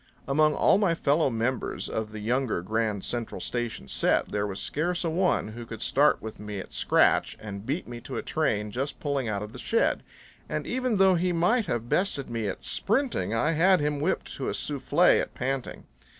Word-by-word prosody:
Among 155 Hz, +2 st, +3 dB
all -, -, +4 dB
my 185 Hz, -5 st, +2 dB
fellow 150 Hz, -1 st, +2 dB
members 120 Hz, +2 st, -2 dB
of 110 Hz, -1 st, -3 dB
the 110 Hz, -1 st, -7 dB
younger 120 Hz, -4 st, 0 dB
Grand 110 Hz, 0 st, -1 dB
Central 120 Hz, -2 st, -3 dB
Station 120 Hz, -, -3 dB
set -, -, +1 dB
there 105 Hz, 0 st, -1 dB
was 95 Hz, -1 st, -5 dB
scarce 175 Hz, +4 st, -1 dB
a 165 Hz, -, 0 dB
one 180 Hz, -, +1 dB
who 120 Hz, +2 st, -7 dB
could 115 Hz, -1 st, -7 dB
start 145 Hz, +2 st, +3 dB
with 110 Hz, -1 st, -7 dB
me 105 Hz, -1 st, -5 dB
at -, -, -9 dB
scratch -, -, +3 dB
and 100 Hz, -1 st, -7 dB
beat 150 Hz, +7 st, -2 dB
me 120 Hz, 0 st, -7 dB
to -, -, -6 dB
a -, -, -3 dB
train 105 Hz, 0 st, 0 dB
just 135 Hz, +6 st, -3 dB
pulling 140 Hz, -4 st, -1 dB
out 100 Hz, -1 st, -2 dB
of 105 Hz, +1 st, -9 dB
the -, -, -9 dB
shed; 230 Hz, -, +1 dB, 0.5 s
and -, -, -2 dB
even 255 Hz, -3 st, 0 dB
though 190 Hz, -1 st, +6 dB
he 180 Hz, +1 st, +1 dB
might 205 Hz, +7 st, +2 dB
have 120 Hz, 0 st, -2 dB
bested 145 Hz, -6 st, 0 dB
me 115 Hz, -2 st, -2 dB
at 95 Hz, -, -5 dB
sprinting, 210 Hz, -, 0 dB
I 150 Hz, +8 st, +2 dB
had 180 Hz, +4 st, +4 dB
him 145 Hz, -1 st, 0 dB
whipped 165 Hz, +6 st, -1 dB
to -, -, -2 dB
a -, -, -2 dB
soufflé -, -, +3 dB
at -, -, -6 dB
panting. 135 Hz, 0 st, -3 dB
130 Hz, 205 wpm, -27 LUFS, 110-165 Hz, 0.5 s, though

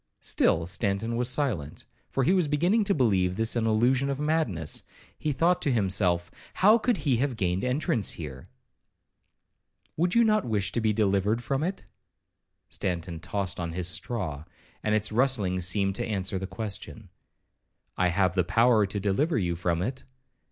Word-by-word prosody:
'—Still 80 Hz, -, +1 dB
Stanton 100 Hz, +5 st, -1 dB
was 120 Hz, +1 st, 0 dB
silent; 125 Hz, -, -2 dB, 0.2 s
for 135 Hz, -, 0 dB
he 175 Hz, -, +3 dB
was 180 Hz, -5 st, +2 dB
beginning 175 Hz, +10 st, +2 dB
to 200 Hz, -, +2 dB
believe 95 Hz, -, +2 dB
this 115 Hz, +3 st, 0 dB
an 115 Hz, -1 st, +1 dB
illusion 125 Hz, +5 st, +2 dB
of 140 Hz, 0 st, -2 dB
madness. 150 Hz, -, -1 dB, 0.3 s
He 155 Hz, -, -2 dB
thought 170 Hz, +5 st, +2 dB
to 140 Hz, -, +1 dB
himself, 95 Hz, -5 st, +1 dB, 0.2 s
'How 215 Hz, +4 st, +5 dB
could 235 Hz, -1 st, +1 dB
he 130 Hz, -5 st, +3 dB
have 130 Hz, +1 st, -1 dB
gained 90 Hz, -2 st, -1 dB
entrance 125 Hz, -4 st, +1 dB
here?'—'Would 85 Hz, -, -9 dB
you 235 Hz, -, +6 dB
not 215 Hz, -2 st, +3 dB
wish 105 Hz, -4 st, -1 dB
to 120 Hz, -, -1 dB
be 110 Hz, -1 st, +2 dB
delivered 105 Hz, +2 st, +1 dB
from 135 Hz, +4 st, -1 dB
it?' 185 Hz, +4 st, -3 dB, 0.8 s
Stanton 85 Hz, -2 st, -4 dB
tossed 95 Hz, +3 st, -3 dB
on 85 Hz, -1 st, -3 dB
his 90 Hz, 0 st, -2 dB
straw, 85 Hz, -, -2 dB, 0.4 s
and 105 Hz, 0 st, +1 dB
its 110 Hz, 0 st, -1 dB
rustling 110 Hz, -6 st, +1 dB
seemed 95 Hz, +2 st, +1 dB
to 120 Hz, -, -2 dB
answer 95 Hz, -3 st, -2 dB
the 95 Hz, -, -5 dB
question. 105 Hz, -1 st, -5 dB, 0.9 s
'I 90 Hz, -, +2 dB
have 90 Hz, 0 st, +1 dB
the 90 Hz, -1 st, +2 dB
power 115 Hz, +2 st, +3 dB
to 100 Hz, +1 st, -4 dB
deliver 110 Hz, -, +1 dB
you 85 Hz, -4 st, 0 dB
from 85 Hz, 0 st, -1 dB
it.' 130 Hz, +5 st, -4 dB
110 Hz, 165 wpm, -27 LUFS, 90-135 Hz, 0.9 s, you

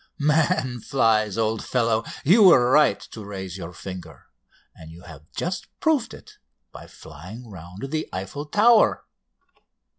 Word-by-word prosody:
"'Man 150 Hz, -4 st, +1 dB
flies!' 110 Hz, -5 st, +1 dB
old 110 Hz, -1 st, -1 dB
fellow! 115 Hz, -3 st, 0 dB, 0.2 s
You 195 Hz, +10 st, +5 dB
were 130 Hz, -11 st, +6 dB
right 150 Hz, +2 st, +4 dB
to 110 Hz, -, -10 dB
raise 95 Hz, -3 st, -7 dB
your 90 Hz, -3 st, -7 dB
finger, 90 Hz, +1 st, -10 dB, 0.4 s
and 80 Hz, -, -13 dB
you 85 Hz, +2 st, -14 dB
have 80 Hz, -2 st, -14 dB
just 180 Hz, +2 st, -4 dB
proved 305 Hz, -7 st, 0 dB
it -, -, -17 dB, 0.3 s
by -, -, -12 dB
flying 95 Hz, +11 st, -12 dB
round 95 Hz, -, -9 dB
the 155 Hz, 0 st, -3 dB
Eiffel 95 Hz, +11 st, -6 dB
Tower. 215 Hz, +6 st, +4 dB
115 Hz, 140 wpm, -23 LUFS, 95-150 Hz, 0.4 s, were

